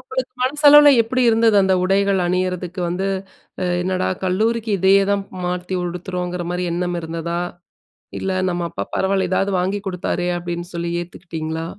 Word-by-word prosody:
உங்களுக்கு 455 -1 -4
மனசளவுல 295 +2 +7
எப்படி 255 +3 -1
இருந்தது? 225 -1 +4
அந்த 190 0 +3
உடைகள் 195 0 +2
அணியிறதுக்கு, 180 0 -2
வந்து 185 +3 -2 0.8
என்னடா? 185 0 -1 0.2
கல்லூரிக்கு 220 +4 0
இதே 190 +2 +4 0.2
தான் 200 0 +1 0.2
மாத்தி 180 +1 -2
உடுத்துறோங்குற 180 0 -4
மாரி 180 0 -2
எண்ணம் 175 0 -2
இருந்ததா? 165 +1 -4 0.8
இல்ல, 190 - -2 0.2
"நம்ம 175 0 -2
அப்பா 100 - -4
பரவாயில்ல, 190 -1 +1
இதாவது 195 +1 +1
வாங்கி 190 +3 -1
கொடுத்தாரே" 180 -1 -2
அப்படின்னு 175 0 -5
சொல்லி 170 0 -3
ஏத்துகிட்டிங்களா? 160 -2 -6
185 Hz, 135 wpm, -20 LUFS, 175-200 Hz, 0.8 s, மனசளவுல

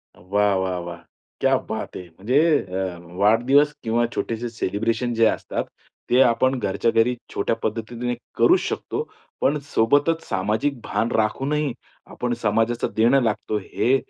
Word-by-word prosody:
वाह, 100 +3 +1
वाह, 95 -1 -1
वाह! 85 0 -7 0.4
क्या - - +3
बात - - -4
है. 90 - -7
म्हणजे 105 - 0 0.2
अ, 95 -1 -4 0.2
वाढदिवस 120 +9 +4
किंवा 115 +1 +1
छोटेसे 115 +1 -2
सेलिब्रेशन 115 +2 -1
जे 115 0 +3
असतात - - -2 0.5
ते 125 +2 +5
आपण 130 +2 +3
घरच्या 110 +2 0
घरी 115 +2 +3 0.2
छोट्या 105 - 0
पद्धतीने 115 +3 -2 0.2
करूच 360 +2 +5
शकतो. 455 - -3 0.3
पण, 145 +2 +2
सोबतच 145 +6 +2
सामाजिक 110 +8 -1
भान 115 - -1
राखूनही 135 +6 0 0.4
आपण 125 -1 -2
समाजाचं 115 +1 0
देणं 120 +5 +4
लागतो, 110 -1 -1
हे 120 +5 +1
115 Hz, 135 wpm, -23 LUFS, 105-125 Hz, 0.5 s, ते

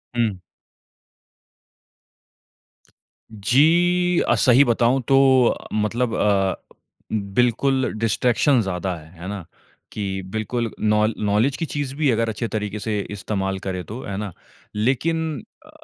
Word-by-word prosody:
हुँ। 110 -6 0 2.9
जी 170 - +3
अ, - - +4
सही 130 +1 +5
बताऊँ 120 +2 +2
तो 135 - +4 0.6
मतलब 115 +3 0
अ, 100 -2 +2 0.6
बिल्कुल 125 +6 +1
डिस्ट्रैक्शन 120 +4 +2
ज़्यादा 95 -2 -3
है। 80 -1 -13
है 90 - -6
ना? 100 -3 -5 0.5
कि 95 -2 -3
बिल्कुल 110 +2 -2
नौ 105 0 +3
नॉलेज 105 +6 +1
की 165 - -2
चीज़ 145 -3 -4
भी 150 0 +1
है, 130 - +4
अगर 115 0 0
अच्छे 110 +2 -3
तरीके 105 -2 -4
से 105 0 -2
इस्तेमाल 95 -1 -3
करे 95 -1 -4
तो, 110 +9 -8
है 100 - -5
ना? 105 -1 -4 0.4
लेकिन 150 +5 -1 0.2
अ, - - -17
110 Hz, 125 wpm, -22 LUFS, 100-130 Hz, 2.9 s, सही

